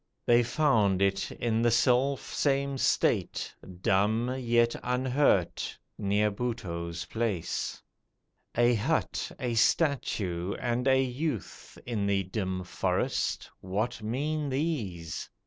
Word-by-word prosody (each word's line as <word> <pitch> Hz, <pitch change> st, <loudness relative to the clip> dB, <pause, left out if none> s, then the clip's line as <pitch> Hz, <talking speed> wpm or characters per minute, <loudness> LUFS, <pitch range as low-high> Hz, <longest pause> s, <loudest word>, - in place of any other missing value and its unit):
They 120 Hz, 0 st, +5 dB
found 115 Hz, -7 st, +2 dB
it, 95 Hz, 0 st, +1 dB
in 115 Hz, -1 st, 0 dB
the 120 Hz, -, +4 dB
selfsame 135 Hz, +3 st, +1 dB
state, -, -, +1 dB, 0.3 s
Dumb, 110 Hz, +6 st, +2 dB
yet 120 Hz, -1 st, +2 dB
unhurt, 125 Hz, -, +1 dB, 0.2 s
near 105 Hz, +1 st, +1 dB
Buttoo's 85 Hz, -7 st, -4 dB
place. 110 Hz, -7 st, -2 dB, 0.7 s
A 120 Hz, +1 st, +5 dB
hut, 105 Hz, -3 st, -1 dB
a 125 Hz, -2 st, -1 dB
statue, 110 Hz, -, +1 dB
and 120 Hz, +2 st, -1 dB
a 130 Hz, 0 st, +5 dB
youth 130 Hz, -, -3 dB
In 110 Hz, -4 st, -1 dB
the 100 Hz, -1 st, +2 dB
dim 95 Hz, -1 st, -3 dB
forest, 90 Hz, -, -1 dB
what 105 Hz, +6 st, -2 dB
mean 145 Hz, +7 st, -2 dB
these? 115 Hz, -, -3 dB
115 Hz, 105 wpm, -29 LUFS, 100-130 Hz, 0.7 s, They